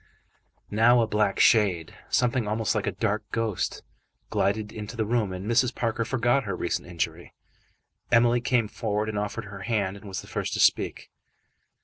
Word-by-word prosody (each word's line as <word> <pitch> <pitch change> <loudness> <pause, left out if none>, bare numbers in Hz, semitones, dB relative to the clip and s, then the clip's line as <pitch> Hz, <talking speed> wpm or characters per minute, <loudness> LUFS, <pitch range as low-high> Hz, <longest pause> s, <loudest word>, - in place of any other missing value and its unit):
Now 115 +3 +5
a - - -1
black 105 -2 +1
shade, 95 -8 +3 0.2
something 125 -2 +1
almost 110 +1 0
like 105 -2 -1
a - - +1
dark 105 +2 -1
ghost, 115 -5 -2 0.5
glided 105 +1 0
into 110 +2 -7
the 110 - 0
room, 110 -3 0
and 95 +1 -6
Mrs. 120 +2 +2
Parker 115 -1 -1
forgot 120 +3 +1
her 100 -2 -2
recent 85 - -2
injury. 85 -2 -4 0.8
Emily 120 +1 +4
came 120 -3 +1
forward 105 0 -2
and 105 -1 -2
offered 105 +2 -4
her 100 -1 -9
hand, 100 -2 -1
and 100 - -12
was 95 -2 -4
the - - -14
first - - -3
to - - -2
speak. - - +2
110 Hz, 170 wpm, -26 LUFS, 100-115 Hz, 0.8 s, Now